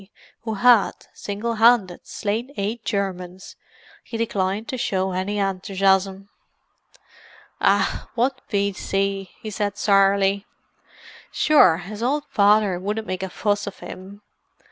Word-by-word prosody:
who 220 Hz, -1 st, -2 dB
had, 240 Hz, -1 st, +5 dB, 0.2 s
single 210 Hz, +3 st, -4 dB
handed, 225 Hz, -7 st, +4 dB
slain 220 Hz, +4 st, -3 dB
eight 215 Hz, +4 st, -3 dB
Germans, 185 Hz, -3 st, -4 dB, 0.5 s
he 230 Hz, -, -6 dB
declined 205 Hz, -1 st, -1 dB
to -, -, -2 dB
show 190 Hz, -3 st, -1 dB
any 190 Hz, +3 st, -2 dB
enthusiasm. 195 Hz, 0 st, 0 dB, 1.3 s
"Ah, -, -, +1 dB
what 255 Hz, +2 st, 0 dB
V.C.!" 195 Hz, -1 st, -1 dB
he 215 Hz, -, -7 dB
said 205 Hz, 0 st, -2 dB
sourly. 195 Hz, 0 st, +3 dB, 0.8 s
"Sure, 235 Hz, -, +5 dB
his 205 Hz, +5 st, -8 dB
owld 280 Hz, +5 st, 0 dB
father 205 Hz, -4 st, +3 dB
wouldn't 210 Hz, +4 st, -3 dB
make 185 Hz, -2 st, -4 dB
a 190 Hz, -, -3 dB
fuss 205 Hz, +2 st, -1 dB
of 200 Hz, -, -6 dB
him. 200 Hz, +2 st, -10 dB
200 Hz, 120 wpm, -22 LUFS, 190-215 Hz, 1.3 s, had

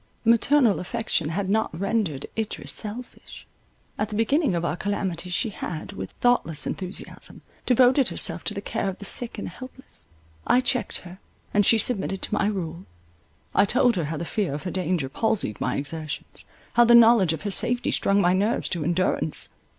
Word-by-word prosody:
Maternal 235 Hz, 0 st, +4 dB
affection 185 Hz, -5 st, -2 dB
had 190 Hz, +4 st, -2 dB
not 200 Hz, -5 st, 0 dB
rendered 195 Hz, -8 st, -1 dB
Idris 220 Hz, -1 st, -4 dB
selfish; 230 Hz, +3 st, -8 dB, 0.5 s
at 210 Hz, +1 st, -1 dB
the 210 Hz, -, -5 dB
beginning 265 Hz, -, +2 dB
of 170 Hz, 0 st, -1 dB
our 155 Hz, -, -1 dB
calamity 185 Hz, -2 st, -3 dB
she 210 Hz, +5 st, -1 dB
had, 170 Hz, -1 st, -6 dB
with -, -, -6 dB
thoughtless 165 Hz, -11 st, +1 dB
enthusiasm, 185 Hz, 0 st, -5 dB, 0.2 s
devoted 255 Hz, +1 st, +4 dB
herself -, -, 0 dB
to -, -, -2 dB
the -, -, -4 dB
care 195 Hz, -, -2 dB
of 190 Hz, -, -6 dB
the 200 Hz, -, -8 dB
sick 235 Hz, +2 st, +2 dB
and -, -, -5 dB
helpless. 260 Hz, +1 st, -12 dB, 0.4 s
I 250 Hz, -, +5 dB
checked 250 Hz, -3 st, 0 dB
her; 180 Hz, +1 st, -12 dB, 0.3 s
and 205 Hz, -, +4 dB
she 225 Hz, -, +5 dB
submitted 195 Hz, -4 st, 0 dB
to -, -, -1 dB
my 205 Hz, -, +2 dB
rule. 180 Hz, -3 st, -4 dB, 0.7 s
I -, -, +5 dB
told 245 Hz, +2 st, +3 dB
her 170 Hz, -4 st, -1 dB
how 155 Hz, +2 st, -4 dB
the 170 Hz, -, -4 dB
fear 190 Hz, -7 st, -2 dB
of 145 Hz, -, -6 dB
her 185 Hz, -, -4 dB
danger 180 Hz, -5 st, -1 dB
palsied 200 Hz, -, -1 dB
my 125 Hz, -, 0 dB
exertions, 155 Hz, +1 st, -5 dB, 0.3 s
how 240 Hz, -, +6 dB
the 235 Hz, 0 st, +6 dB
knowledge 230 Hz, -7 st, +6 dB
of 160 Hz, -, -6 dB
her 205 Hz, -, -2 dB
safety 245 Hz, +5 st, +1 dB
strung 200 Hz, 0 st, +2 dB
my 180 Hz, -2 st, +3 dB
nerves 205 Hz, +5 st, 0 dB
to 170 Hz, -4 st, -2 dB
endurance. 175 Hz, -2 st, -1 dB
200 Hz, 180 wpm, -25 LUFS, 175-230 Hz, 0.7 s, how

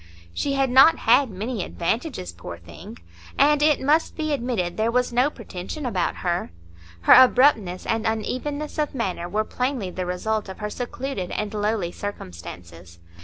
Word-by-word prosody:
She 280 Hz, -, -1 dB
had 270 Hz, -2 st, +1 dB
not 270 Hz, +6 st, +7 dB
had 250 Hz, +3 st, +4 dB
many 210 Hz, +2 st, -4 dB
advantages, 220 Hz, -, -3 dB
poor 85 Hz, 0 st, -9 dB
thing! 85 Hz, -2 st, -12 dB, 0.4 s
and 295 Hz, +1 st, +4 dB
it 300 Hz, -1 st, +4 dB
must 300 Hz, +4 st, +1 dB
be 310 Hz, -2 st, -1 dB
admitted 235 Hz, -10 st, -2 dB
there 220 Hz, +1 st, +1 dB
was 250 Hz, 0 st, 0 dB
no 250 Hz, +4 st, +3 dB
pretension 230 Hz, +2 st, -7 dB
about 190 Hz, -8 st, -1 dB
her; 175 Hz, -, 0 dB, 0.5 s
her -, -, +7 dB
abruptness 250 Hz, -8 st, +5 dB
and 225 Hz, 0 st, 0 dB
unevenness 285 Hz, +8 st, -3 dB
of 300 Hz, -2 st, -1 dB
manner 180 Hz, -7 st, -3 dB
were 215 Hz, +3 st, 0 dB
plainly 250 Hz, -5 st, -2 dB
the 185 Hz, 0 st, -4 dB
result 210 Hz, +4 st, -2 dB
of 190 Hz, -, -8 dB
her 210 Hz, 0 st, -4 dB
secluded 245 Hz, -5 st, -4 dB
and 210 Hz, -1 st, -3 dB
lowly 210 Hz, -4 st, -1 dB
circumstances. 85 Hz, -, -9 dB
220 Hz, 160 wpm, -24 LUFS, 180-265 Hz, 0.5 s, not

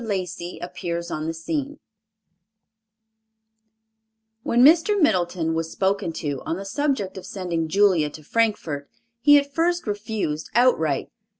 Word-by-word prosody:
LACEY 185 Hz, -4 st, -4 dB
APPEARS 170 Hz, -1 st, -4 dB
UPON 155 Hz, +1 st, -3 dB
THE 165 Hz, -, -2 dB
SCENE 285 Hz, -, -3 dB, 2.6 s
When 240 Hz, +2 st, +4 dB
Mr. 340 Hz, +7 st, +5 dB
Middleton 175 Hz, -, +1 dB
was 165 Hz, 0 st, -2 dB
spoken 195 Hz, -2 st, 0 dB
to 145 Hz, -4 st, -4 dB
on 165 Hz, -, -3 dB
the 195 Hz, -, -7 dB
subject 205 Hz, -5 st, -1 dB
of -, -, -12 dB
sending 170 Hz, -4 st, -3 dB
Julia 185 Hz, -4 st, +3 dB
to 155 Hz, +1 st, -12 dB
Frankfort, 165 Hz, -8 st, -1 dB, 0.3 s
he 290 Hz, +4 st, +7 dB
at 280 Hz, 0 st, -1 dB
first 345 Hz, +2 st, +1 dB
refused 205 Hz, -7 st, -3 dB
outright. 160 Hz, -, +2 dB
190 Hz, 125 wpm, -23 LUFS, 165-245 Hz, 2.6 s, he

